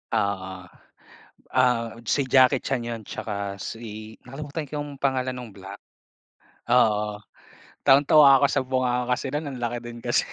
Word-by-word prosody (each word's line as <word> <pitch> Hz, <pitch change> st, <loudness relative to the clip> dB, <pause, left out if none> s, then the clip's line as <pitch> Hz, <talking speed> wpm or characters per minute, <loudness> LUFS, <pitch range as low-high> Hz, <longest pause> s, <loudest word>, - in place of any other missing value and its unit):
Oo. 95 Hz, -2 st, -2 dB, 0.9 s
Ah 120 Hz, -3 st, +1 dB
si 140 Hz, -, +2 dB
Jackie 130 Hz, +1 st, +5 dB
Chan 135 Hz, -, -1 dB
yun 115 Hz, -1 st, -5 dB
tsaka 100 Hz, -2 st, -5 dB
si 110 Hz, +1 st, -8 dB
nakalimutan 145 Hz, +4 st, -6 dB
ko -, -, -30 dB
yung 145 Hz, -1 st, -9 dB
pangalan 130 Hz, -2 st, 0 dB
nung 125 Hz, -2 st, -8 dB
black. 100 Hz, 0 st, -10 dB, 0.9 s
Oo, 105 Hz, -4 st, +3 dB, 0.7 s
tawang-tawa 140 Hz, 0 st, +7 dB
ako -, -, +6 dB
sa -, -, +1 dB
bunganga 125 Hz, -1 st, 0 dB
kasi 125 Hz, -, -4 dB
nun 150 Hz, +2 st, -2 dB
ang 130 Hz, -3 st, -8 dB
laki 120 Hz, 0 st, -2 dB
din 120 Hz, 0 st, -9 dB
kasi. 120 Hz, -, +2 dB
125 Hz, 145 wpm, -25 LUFS, 110-135 Hz, 0.9 s, tawang-tawa